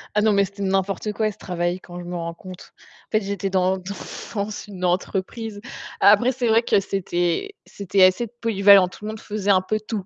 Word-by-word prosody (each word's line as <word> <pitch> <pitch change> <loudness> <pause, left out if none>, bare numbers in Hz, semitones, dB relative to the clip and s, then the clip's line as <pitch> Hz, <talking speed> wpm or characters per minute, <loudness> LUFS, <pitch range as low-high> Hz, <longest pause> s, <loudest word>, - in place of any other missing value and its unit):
Ah, 210 - +4
non, 215 0 +3
mais 200 0 +3
c'était 200 +1 -7
n'importe 195 +2 -1
quoi 215 0 0
ce 210 - -17
travail 175 -2 -2
quand 175 -1 -10
je 175 - -8
me 180 - -5
rends 170 -1 -4
compte. 185 +1 -12 0.4
En - - -60
fait, 215 0 +2
j'étais 200 0 -3
dans 190 0 +1
dans 190 +2 -7 0.4
dans 205 0 -1 0.2
une 185 -3 -5
entreprise. 195 +4 -2 0.4
Après, 210 +5 +5
c'est 250 -1 -2
vrai 225 +1 +4
que 205 - +3
c'était 185 - -2
c'était 195 -1 +1
assez 185 +6 +4
polyvalent. 200 -4 +5
Tout 195 +3 -11
le - - -3
monde 220 0 -6
faisait 205 -2 -1
un 185 -1 +4
peu 215 +3 -2
tout 210 -4 -4
200 Hz, 215 wpm, -22 LUFS, 185-215 Hz, 0.4 s, Après